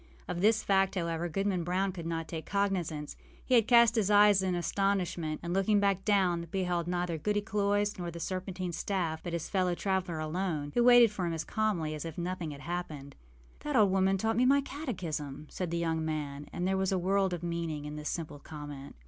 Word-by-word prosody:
Of 175 Hz, 0 st, -3 dB
this 220 Hz, +2 st, +3 dB
fact, 195 Hz, 0 st, +2 dB
however, 170 Hz, -1 st, -2 dB
Goodman 195 Hz, 0 st, -1 dB
Brown 185 Hz, +3 st, 0 dB
could 170 Hz, -3 st, -6 dB
not 165 Hz, -1 st, -3 dB
take 160 Hz, -1 st, -6 dB
cognizance. 180 Hz, -7 st, -1 dB, 0.3 s
He 255 Hz, -, 0 dB
had 230 Hz, -3 st, +5 dB
cast 235 Hz, -2 st, +6 dB
up -, -, -4 dB
his 210 Hz, -3 st, +2 dB
eyes 205 Hz, -1 st, +6 dB
in 185 Hz, -1 st, 0 dB
astonishment, 175 Hz, -4 st, -1 dB
and, 170 Hz, 0 st, -3 dB
looking 195 Hz, +2 st, +3 dB
down 200 Hz, -1 st, +3 dB, 0.4 s
again, 170 Hz, -, -7 dB
beheld 180 Hz, -2 st, -1 dB
neither 175 Hz, -2 st, -1 dB
Goody 210 Hz, +6 st, 0 dB
Cloyse 205 Hz, -1 st, 0 dB
nor 175 Hz, -1 st, -3 dB
the 170 Hz, 0 st, -7 dB
serpentine 185 Hz, 0 st, -4 dB
staff, 170 Hz, -3 st, -2 dB
but 175 Hz, -, -6 dB
his 170 Hz, -2 st, -3 dB
fellow 185 Hz, -2 st, +1 dB
traveller 185 Hz, -3 st, -1 dB
alone, 155 Hz, -2 st, -2 dB
who 240 Hz, -, +3 dB
waited 245 Hz, -2 st, +7 dB
for 185 Hz, -4 st, -2 dB
him 170 Hz, -, -2 dB
as 160 Hz, -, -3 dB
calmly 200 Hz, -8 st, -1 dB
as 155 Hz, -, -5 dB
if 165 Hz, -2 st, -7 dB
nothing 175 Hz, -1 st, -3 dB
had 145 Hz, -1 st, -8 dB
happened. 155 Hz, -5 st, -5 dB, 0.4 s
âThat 295 Hz, -1 st, -3 dB
old 210 Hz, -5 st, +5 dB
woman 190 Hz, 0 st, +3 dB
taught 225 Hz, +3 st, 0 dB
me 250 Hz, -, +4 dB
my 280 Hz, +1 st, +5 dB
catechism,â 165 Hz, -, -5 dB
said 180 Hz, -2 st, -3 dB
the 170 Hz, -, -2 dB
young 165 Hz, -1 st, -1 dB
man; 150 Hz, -2 st, -4 dB
and 180 Hz, -, -2 dB
there 190 Hz, 0 st, +1 dB
was 190 Hz, 0 st, 0 dB
a 190 Hz, -, +2 dB
world 190 Hz, +1 st, +1 dB
of 175 Hz, -1 st, -4 dB
meaning 165 Hz, -3 st, -3 dB
in 150 Hz, 0 st, -6 dB
this 150 Hz, 0 st, -4 dB
simple 155 Hz, -4 st, -5 dB
comment. 145 Hz, -2 st, -9 dB
180 Hz, 215 wpm, -30 LUFS, 160-200 Hz, 0.4 s, waited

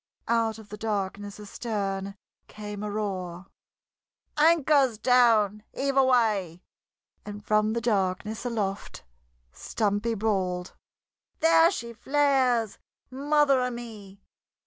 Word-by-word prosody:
Out 225 Hz, -2 st, +1 dB
of 220 Hz, -2 st, -14 dB
the 210 Hz, -, -8 dB
darkness 205 Hz, -1 st, -4 dB
astern 200 Hz, -2 st, -4 dB, 0.3 s
came 210 Hz, -1 st, -8 dB
a 210 Hz, -, -4 dB
roar: 190 Hz, -4 st, -4 dB, 0.9 s
"Anchor's 295 Hz, -6 st, +3 dB
down! 225 Hz, -4 st, +3 dB
Heave 275 Hz, 0 st, -1 dB
away!" 220 Hz, -10 st, +2 dB, 0.6 s
And 205 Hz, 0 st, -9 dB
from 215 Hz, 0 st, +2 dB
the 235 Hz, -, -2 dB
darkness 210 Hz, -1 st, -1 dB
aloft 210 Hz, -5 st, -4 dB, 0.5 s
Stumpy 210 Hz, -, -2 dB
bawled: 190 Hz, -4 st, -2 dB, 0.7 s
"There 330 Hz, +1 st, +6 dB
she 235 Hz, -10 st, -5 dB
flares! 260 Hz, -3 st, +1 dB, 0.3 s
Mother 280 Hz, 0 st, +2 dB
o' 250 Hz, -, 0 dB
me!" 215 Hz, -5 st, -10 dB
215 Hz, 100 wpm, -26 LUFS, 200-250 Hz, 0.9 s, There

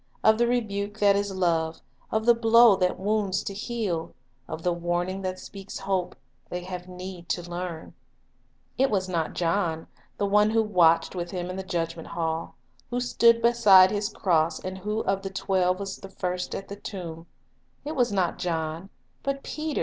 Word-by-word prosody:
Of 220 Hz, +1 st, +5 dB
the 240 Hz, -, +4 dB
rebuke 210 Hz, -4 st, -1 dB
that 205 Hz, -2 st, +4 dB
is 200 Hz, 0 st, -1 dB
love, 165 Hz, -4 st, 0 dB, 0.3 s
of 220 Hz, 0 st, 0 dB
the 240 Hz, -, +7 dB
blow 230 Hz, -1 st, +6 dB
that 180 Hz, -1 st, 0 dB
wounds 200 Hz, -1 st, 0 dB
to 200 Hz, -, -4 dB
heal, 205 Hz, -6 st, -3 dB, 0.3 s
of 160 Hz, +1 st, -6 dB
the 180 Hz, -, +2 dB
warning 175 Hz, +2 st, -2 dB
that 185 Hz, -1 st, -3 dB
speaks 195 Hz, +1 st, -9 dB
hope, 190 Hz, -2 st, -2 dB, 0.3 s
they 180 Hz, 0 st, -4 dB
have 180 Hz, 0 st, -7 dB
need 180 Hz, -1 st, -8 dB
to 175 Hz, -1 st, -2 dB
learn. 175 Hz, -2 st, -6 dB, 0.9 s
It 270 Hz, +1 st, +4 dB
was 190 Hz, -3 st, 0 dB
not 170 Hz, -3 st, -2 dB
John, 165 Hz, -2 st, 0 dB, 0.3 s
the 205 Hz, -, 0 dB
one 210 Hz, +1 st, +4 dB
who 225 Hz, 0 st, +3 dB
watched 170 Hz, -5 st, +3 dB
with 175 Hz, -2 st, -4 dB
Him 180 Hz, 0 st, -4 dB
in -, -, -6 dB
the 190 Hz, -, -3 dB
judgment 165 Hz, -3 st, -3 dB
hall, 165 Hz, -1 st, -3 dB, 0.3 s
who 245 Hz, -, -1 dB
stood 235 Hz, -1 st, +4 dB
beside 205 Hz, -6 st, +7 dB
His 205 Hz, 0 st, -1 dB
cross, 165 Hz, -6 st, +1 dB
and 185 Hz, 0 st, -6 dB
who 210 Hz, +3 st, -2 dB
of 195 Hz, 0 st, 0 dB
the 195 Hz, -, -4 dB
twelve 185 Hz, -1 st, 0 dB
was 195 Hz, -1 st, -5 dB, 0.2 s
first 180 Hz, -1 st, -2 dB
at 195 Hz, -, -6 dB
the 200 Hz, -, -7 dB
tomb, 170 Hz, -5 st, -7 dB, 0.3 s
— -, -, -41 dB
it 305 Hz, -, -4 dB
was 245 Hz, -3 st, +2 dB
not 185 Hz, -4 st, 0 dB
John, 165 Hz, +1 st, -3 dB, 0.3 s
but 275 Hz, 0 st, -3 dB
Peter 310 Hz, -1 st, -3 dB
190 Hz, 180 wpm, -26 LUFS, 175-210 Hz, 0.9 s, the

